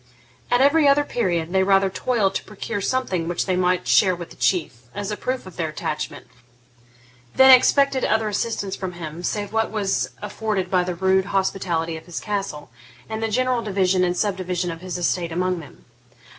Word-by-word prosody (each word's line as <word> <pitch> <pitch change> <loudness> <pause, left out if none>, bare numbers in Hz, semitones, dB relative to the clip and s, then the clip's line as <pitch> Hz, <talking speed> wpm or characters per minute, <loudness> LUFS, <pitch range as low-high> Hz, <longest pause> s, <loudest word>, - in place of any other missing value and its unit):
At 245 +1 +3
every 290 +2 +5
other 280 +1 +5
period 175 - -1
they 190 - +4
rather 195 0 +4
toiled 210 -3 0
to - - -3
procure 205 -1 -5
something 190 -8 -1
which 175 0 -1
they 185 - 0
might 180 0 +1
share 185 -3 +4
with 170 -1 -9
the - - -12
Chief, 170 -10 0 0.2
as 205 +1 -4
a - - -1
proof 255 +4 -3
of 185 - -12
their 160 -2 -1
attachment, 155 0 -5 1.1
than 265 0 +8
expected 270 +1 +5
other 220 0 +1
assistance 205 -2 -2
from 185 -2 -5
him 165 -1 -7
save 205 +3 -3
what 225 0 +1
was 205 -3 -1
afforded 205 -2 -3
by 180 -1 +3
the 180 0 -3
rude 190 +1 +2
hospitality 180 -4 -1
of 160 - -13
his 175 - -5
castle, 195 - -4 0.4
and 220 0 -5
the 225 - 0
general 255 +2 +1
division 190 -3 +1
and 180 0 0
subdivision 185 -3 -1
of 165 0 -8
his 185 -1 -5
estate 175 -1 -1
among 180 +1 -1
them. 150 - -14
190 Hz, 185 wpm, -22 LUFS, 175-215 Hz, 1.1 s, than